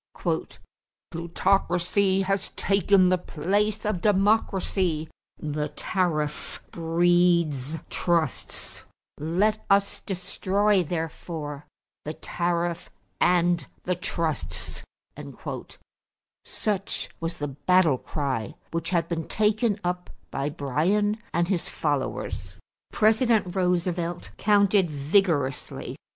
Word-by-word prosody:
"Plutocracy 185 +2 +2
has 195 +1 0
taken 195 -1 +4
the 185 0 +3
place 205 +7 0
of 210 -5 -1
democracy; 195 -5 +2 0.3
the 150 0 -2
tariff 155 -6 -1
breeds 170 -3 +2
trusts; 170 -3 -1 0.4
let 190 +8 +1
us 200 0 +3
destroy 195 +2 +1
therefore 160 -3 -4 0.4
the 155 - -4
tariff 170 0 -2 0.3
and 175 -1 +3 0.2
the 180 - 0
trusts" 155 - -2 1.6
such 200 -2 -2
was 165 +1 -3
the 145 - -2
battle 155 0 +3
cry 135 -8 -3 0.2
which 165 -1 -1
had 170 -3 +1
been 165 -2 -3
taken 215 0 +2
up 180 0 -2 0.2
by 140 +1 -1
Bryan 175 - +1
and 170 +1 +1
his 180 -3 -1
followers. 130 - -2 0.4
President 220 -4 +3
Roosevelt 175 -1 0
countered 200 -3 +4
vigorously. 145 -2 0
175 Hz, 90 wpm, -26 LUFS, 160-195 Hz, 1.6 s, taken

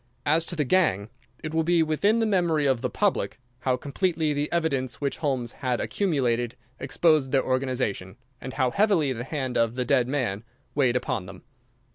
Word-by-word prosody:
As 160 +3 +2
to 175 - -5
the 155 - +1
gang, 115 - +2 0.3
it 155 0 -4
will 160 - +2
be 170 0 +3
within 180 +8 +2
the 225 - +2
memory 175 -7 +2
of 130 -4 +2
the 125 - -1
public 205 +6 0 0.2
how 130 -1 0
completely 160 +2 -1
the 145 +1 -2
evidence 140 -7 -1
which 140 -1 -2
Holmes 130 -6 -1
had 125 -2 -2
accumulated 120 - 0 0.2
exposed 145 0 +2
their 135 - +3
organization, 130 -7 -2 0.2
and 130 - -6
how 130 -3 +1
heavily 190 - +2
the 120 0 -5
hand 130 -3 -2
of 115 0 +1
the 125 -1 -1
dead 125 0 +2
man 120 -7 -1 0.3
weighed 130 -4 +2
upon 125 -7 -2
them. 95 -1 -11
135 Hz, 180 wpm, -26 LUFS, 125-160 Hz, 0.3 s, be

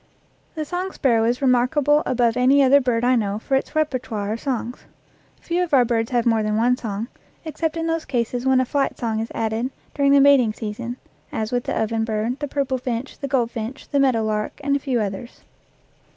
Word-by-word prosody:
The 310 -1 -3
song 365 +4 -3
sparrow 230 -8 +2
is 245 +4 0
remarkable 270 +4 +3
above 245 -2 +2
any 265 +3 +4
other 275 +2 +5
bird 240 -2 0
I 255 +1 +4
know 205 -3 0
for 250 +5 -5
its 270 +3 0
repertoire 245 -9 -1
of 225 - -5
songs. 250 -2 -4 0.5
Few 345 +1 -1
of 325 -5 +1
our 250 -2 +5
birds 225 -1 0
have 240 -2 0
more 225 -2 +3
than 215 0 0
one 245 +3 +3
song, 220 -2 -4 0.4
except 320 +1 -3
in 325 - -2
those 325 -1 -1
cases 245 -1 -2
when 265 -1 +3
a 260 - +2
flight 280 +2 -1
song 225 -2 -2
is 225 - -3
added 225 +3 -1 0.2
during 280 -1 +2
the 280 - +6
mating 270 -5 +5
sea 210 -1 -5
son, 240 +2 -6 0.3
as 220 0 -3
with 245 -1 -1
the - - -1
oven 225 0 0
bird, 225 +3 -2
the 290 - -3
purple 270 -2 -1
finch, 245 +1 -4
the 280 - -4
goldfinch, 240 -1 -2
the 280 - +1
meadowlark, 220 -5 0
and 280 0 +1
a - - +1
few 260 -3 -1
others. 205 +3 -5
250 Hz, 210 wpm, -22 LUFS, 225-280 Hz, 0.5 s, the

